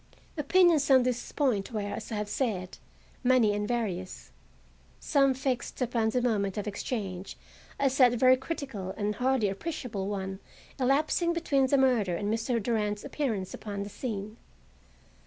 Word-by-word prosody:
Opinions 325 Hz, -1 st, +4 dB
on 260 Hz, -2 st, +6 dB
this 250 Hz, -1 st, -2 dB
point 250 Hz, -8 st, 0 dB
were, 215 Hz, -2 st, -2 dB
as 205 Hz, +3 st, -5 dB
I -, -, -2 dB
have 210 Hz, 0 st, -2 dB
said, 205 Hz, -5 st, -2 dB, 0.4 s
many 245 Hz, -4 st, +4 dB
and 205 Hz, 0 st, -2 dB
various. 200 Hz, -6 st, -3 dB, 0.7 s
Some 275 Hz, -3 st, +3 dB
fixed 255 Hz, -2 st, -2 dB
upon 235 Hz, -3 st, +1 dB
the 245 Hz, +2 st, 0 dB
moment 205 Hz, -5 st, 0 dB
of 210 Hz, -, -2 dB
exchange 200 Hz, -3 st, -4 dB, 0.4 s
as 270 Hz, -1 st, +1 dB
that 250 Hz, -2 st, +7 dB
very 255 Hz, +2 st, +5 dB
critical 260 Hz, -, -5 dB
and 210 Hz, 0 st, -1 dB
hardly 250 Hz, -1 st, +1 dB
appreciable 215 Hz, -, -4 dB
one 190 Hz, -1 st, -4 dB, 0.4 s
elapsing 305 Hz, +6 st, +2 dB
between 280 Hz, -6 st, +1 dB
the 280 Hz, -, +3 dB
murder 240 Hz, -9 st, +2 dB
and 205 Hz, +4 st, -1 dB
Mr. 230 Hz, +2 st, 0 dB
Durand's 210 Hz, -2 st, -1 dB
appearance 220 Hz, -11 st, -2 dB
upon 200 Hz, -2 st, -5 dB
the 200 Hz, -, -7 dB
scene. 215 Hz, -1 st, -5 dB
230 Hz, 150 wpm, -29 LUFS, 205-265 Hz, 0.7 s, that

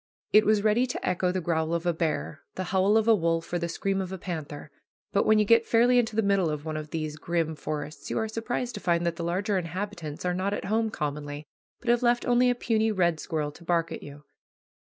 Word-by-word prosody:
It 215 Hz, 0 st, +6 dB
was 215 Hz, -1 st, +3 dB
ready 220 Hz, +4 st, +3 dB
to 250 Hz, -, -4 dB
echo 180 Hz, 0 st, +1 dB
the 185 Hz, 0 st, -2 dB
growl 160 Hz, 0 st, 0 dB
of 170 Hz, +1 st, -3 dB
a 175 Hz, -, +2 dB
bear, 155 Hz, -2 st, -2 dB
the 185 Hz, -, -2 dB
howl 195 Hz, +3 st, +4 dB
of 220 Hz, 0 st, +1 dB
a 230 Hz, -, +7 dB
wolf, 165 Hz, -3 st, 0 dB
or 175 Hz, -, +1 dB
the 170 Hz, 0 st, -2 dB
scream 195 Hz, +3 st, -1 dB
of 185 Hz, -1 st, -5 dB
a 190 Hz, -, -4 dB
panther; 155 Hz, -5 st, -6 dB, 0.4 s
but 200 Hz, -, +2 dB
when 215 Hz, -, +6 dB
you 210 Hz, -, +4 dB
get 230 Hz, +2 st, +4 dB
fairly 245 Hz, +2 st, +5 dB
into 225 Hz, -3 st, -1 dB
the 225 Hz, -, +2 dB
middle 195 Hz, -4 st, +2 dB
of 150 Hz, 0 st, -4 dB
one 155 Hz, -1 st, -3 dB
of 155 Hz, 0 st, -5 dB
these 155 Hz, -1 st, -4 dB
grim 165 Hz, 0 st, -1 dB
forests 150 Hz, 0 st, -5 dB
you -, -, -2 dB
are 220 Hz, -, 0 dB
surprised 235 Hz, +2 st, -3 dB
to 205 Hz, -, -6 dB
find 170 Hz, -1 st, +1 dB
that 170 Hz, -1 st, -1 dB
the 170 Hz, -, -4 dB
larger 190 Hz, +4 st, 0 dB
inhabitants 175 Hz, -3 st, -5 dB
are 180 Hz, -, +1 dB
not 190 Hz, +3 st, -1 dB
at -, -, -5 dB
home 220 Hz, +2 st, +1 dB
commonly, 145 Hz, -4 st, -4 dB, 0.3 s
but 240 Hz, -, -5 dB
have 240 Hz, 0 st, +4 dB
left 240 Hz, 0 st, +2 dB
only 245 Hz, +1 st, +4 dB
a 245 Hz, -, +2 dB
puny 225 Hz, -2 st, +1 dB
red 175 Hz, -5 st, +1 dB
squirrel 150 Hz, -2 st, -2 dB
to 160 Hz, -, -15 dB
bark 165 Hz, -1 st, 0 dB
at -, -, -6 dB
you. 145 Hz, +1 st, -11 dB
180 Hz, 245 wpm, -27 LUFS, 160-215 Hz, 0.4 s, a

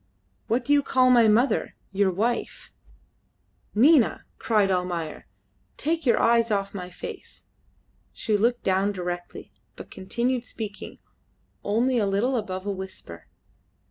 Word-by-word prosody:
What 240 Hz, +2 st, 0 dB
do 290 Hz, -, +3 dB
you 290 Hz, -, +5 dB
call 255 Hz, -2 st, +3 dB
my 235 Hz, -3 st, +6 dB
mother, 225 Hz, +2 st, +2 dB, 0.2 s
your 195 Hz, 0 st, +2 dB
wife?" 225 Hz, +6 st, -3 dB, 1.0 s
"Nina!" 265 Hz, +2 st, +4 dB
cried 210 Hz, -4 st, +2 dB
Almayer, 175 Hz, -3 st, -3 dB, 0.5 s
"take 325 Hz, -1 st, -1 dB
your 235 Hz, -, +4 dB
eyes 230 Hz, 0 st, +3 dB
off 200 Hz, -2 st, -1 dB
my 180 Hz, -3 st, -6 dB
face." -, -, -10 dB, 0.7 s
She 220 Hz, -2 st, -1 dB
looked 235 Hz, +4 st, +1 dB
down 195 Hz, +2 st, +1 dB
directly, 175 Hz, -, -6 dB, 0.2 s
but -, -, -11 dB
continued 235 Hz, +6 st, -2 dB
speaking 215 Hz, -4 st, -7 dB, 0.7 s
only 240 Hz, +4 st, +1 dB
a 205 Hz, -, +1 dB
little 215 Hz, +7 st, 0 dB
above 190 Hz, -4 st, -4 dB
a 205 Hz, -, -1 dB
whisper. 190 Hz, -, -9 dB
210 Hz, 130 wpm, -25 LUFS, 190-240 Hz, 1.0 s, my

